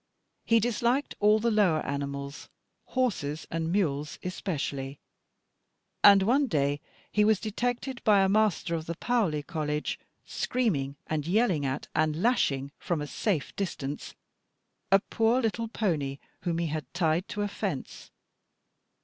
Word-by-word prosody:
He 230 0 +5
disliked 240 +4 +1
all 210 +1 +5
the 230 +2 +1
lower 195 -8 +3
animals, 140 0 -4 0.4
horses 160 - -1
and 165 0 -1
mules 150 -6 0
especially; 145 -7 -3 1.1
and 200 -1 +8
one 265 +7 +3
day 145 - 0 0.3
he 210 - +3
was 215 -1 +4
detected 245 +4 -2
by 205 -2 +5
a - - +4
master 200 -4 +2
of 160 -1 -3
the 170 - -3
Paoli 190 -9 0
College, 150 0 -2 0.3
screaming, 155 - -1
and 155 -1 -2
yelling 180 - +2
at, 135 +2 -3
and 155 0 +1
lashing, 140 - +1
from 170 -3 -1
a 150 - -3
safe 160 0 -2
distance, 150 -7 -4 0.8
a 195 - +9
poor 225 +4 +1
little 230 -1 -1
pony 155 -12 -1 0.2
whom 170 -2 -1
he 170 - 0
had 155 -4 -4
tied 170 0 +1
to 205 0 -3
a - - 0
fence. 200 - -5
175 Hz, 140 wpm, -28 LUFS, 150-220 Hz, 1.1 s, a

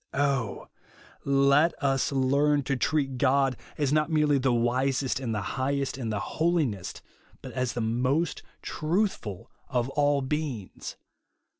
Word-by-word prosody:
Oh 135 -6 0 0.6
let 140 +4 +4
us 135 -2 +1
learn 140 +2 +2
to 135 +1 0
treat 135 -1 0
God 135 0 +3 0.2
as 145 -2 +1
not 155 +1 +2
merely 150 -3 +3
the 130 0 +2
wisest, 125 +2 +1
and 125 -4 -3
the 105 -2 -1 0.2
highest, 140 +1 0
and 120 -4 -3
the 105 - -1 0.2
holiest, 155 - 0 0.4
but - - -7
as 125 -2 -1
the 120 - -2
^nost 125 +9 0 0.2
truthful 155 - -2 0.2
of 125 -1 0
all 145 -1 +2
heings. 140 -9 -4
135 Hz, 135 wpm, -27 LUFS, 125-145 Hz, 0.6 s, let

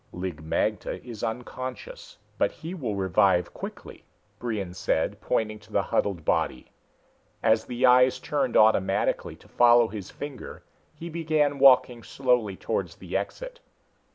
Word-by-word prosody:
"Lig 90 -4 -5
magte 80 - -2
is 115 -4 -8
unconscious, 130 - -6 0.2
but - - +2
he 165 +2 -8
will 125 - -3
revive 95 -1 +2
quickly," - - -9 0.4
Brion 105 -7 -3
said, 90 - -1
pointing 110 -1 -1
at 105 0 -19
the 100 - +1
huddled 95 -6 -1
body. 65 - -1 0.7
As 110 0 +3
the 125 +1 0
eyes 125 0 +5
turned 140 -5 -1
automatically 100 -3 +2
to - - -21
follow 120 -1 +5
his 100 -4 -7
finger, 145 -3 -8 0.3
he 170 - -8
began 155 -4 0
walking 125 -3 +5
slowly 125 -6 0
towards - - -3
the - - -8
exit. - - -4
120 Hz, 135 wpm, -26 LUFS, 100-140 Hz, 0.7 s, eyes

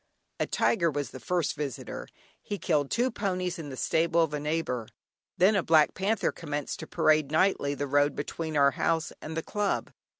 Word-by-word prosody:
A - - 0
tiger 170 -6 +2
was 145 -2 -3
the 130 - -8
first 175 +4 0
visitor; 145 -4 -5 0.3
he 205 - -4
killed 150 -7 +1
two 250 +2 +1
ponies 185 -4 -2
in 150 -3 -6
the 130 - -7
stable 165 +3 +2
of 155 -2 -2
a 150 - -1
neighbour. 150 -6 -2 0.5
Then 195 +4 +5
a 195 - +3
black 160 -2 +4
panther 205 +3 0
commenced 145 -3 -4
to - - -7
parade, 155 -2 +3
nightly, 155 -3 +2
the 145 - -2
road 145 +1 +2
between 155 +1 -3
our 140 -1 +5
house 160 +2 0
and 160 +1 -6
the 160 - -1
club. 205 -1 -1
160 Hz, 190 wpm, -28 LUFS, 145-180 Hz, 0.5 s, Then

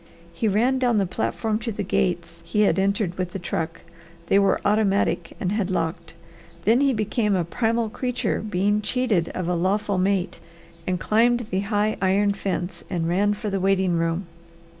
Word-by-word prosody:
He 220 +7 -1
ran 240 +6 +2
down 245 -3 +2
the 200 - +2
platform 220 +3 -2
to 230 0 -3
the 205 -1 -3
gates 170 -2 -1
he 170 +5 0
had 190 -3 +3
entered 195 -2 0
with 180 -1 -2
the - - -2
truck. 165 -2 -4 0.5
They 195 - +5
were 200 - +3
automatic 200 -4 +1
and 185 - -1
had 205 -2 0
locked. 165 -2 -3 0.5
Then 230 +6 +4
he 280 -1 +4
became 215 -2 0
a 175 -2 0
primal 230 +5 0
creature 250 +3 -2
being 205 0 0
cheated 215 -7 0
of 180 -2 -2
a 180 - +1
lawful 195 +3 0
mate 190 -1 0 0.5
and 180 -1 0
climbed 240 +5 +3
the 190 - +1
high 210 +1 0
iron 200 +2 +3
fence 190 -2 -4
and 170 -3 -1
ran 205 +4 +2
for 210 0 -4
the 195 - 0
waiting 190 -1 +2
room. 165 +3 -1
200 Hz, 180 wpm, -24 LUFS, 180-215 Hz, 0.5 s, They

